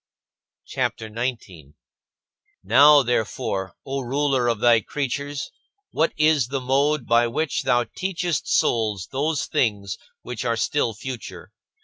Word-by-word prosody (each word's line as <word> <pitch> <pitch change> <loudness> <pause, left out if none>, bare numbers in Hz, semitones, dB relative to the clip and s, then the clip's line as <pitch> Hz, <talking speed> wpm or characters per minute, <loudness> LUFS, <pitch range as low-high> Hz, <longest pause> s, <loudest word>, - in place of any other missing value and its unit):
CHAPTER 110 -1 -3
XIX - - -17 0.3
25. 80 -7 -15 0.9
Now, 140 +7 +7
therefore, 110 -6 -2
O 135 0 -3
Ruler 135 0 0
of 115 -3 0
thy 115 0 +5
creatures, 145 +3 -4 0.4
what 160 - +1
is 155 -5 +3
the 135 +1 -2
mode 135 +2 +1
by 120 0 +3
which 150 +6 -1
thou 125 -2 +2
teachest 175 +5 -3
souls 105 -6 +1
those 145 0 -1
things 100 -5 -1 0.2
which 125 -2 -5
are 115 -2 0
still 115 -2 0
future? 125 +2 -8
125 Hz, 125 wpm, -23 LUFS, 115-145 Hz, 0.9 s, Now